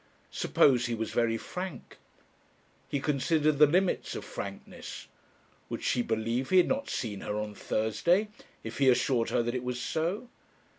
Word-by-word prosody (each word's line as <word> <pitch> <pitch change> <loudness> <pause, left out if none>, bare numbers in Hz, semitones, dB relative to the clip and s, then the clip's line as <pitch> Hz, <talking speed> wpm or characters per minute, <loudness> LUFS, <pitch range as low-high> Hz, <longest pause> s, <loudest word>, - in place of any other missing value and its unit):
Suppose 125 -3 +3
he 120 - -1
was 110 0 -3
very 115 -1 +1
frank 180 -1 -7 0.9
He 140 - 0
considered 150 +1 +1
the 150 - +9
limits 180 +5 +1
of - - -5
frankness. 100 0 -7 0.6
Would - - -5
she 125 - +2
believe 115 +3 -1
he 185 - +4
had 180 - +6
not 280 +1 -1
seen 105 -5 -3
her 105 - -3
on 105 0 -3
Thursday? 170 - +1 0.3
if 110 +4 -6
he 135 -2 +5
assured 125 -1 +2
her - - +1
that 120 0 -2
it 125 -1 -2
was 125 0 -3
so? 170 - -2
125 Hz, 160 wpm, -29 LUFS, 115-160 Hz, 0.9 s, the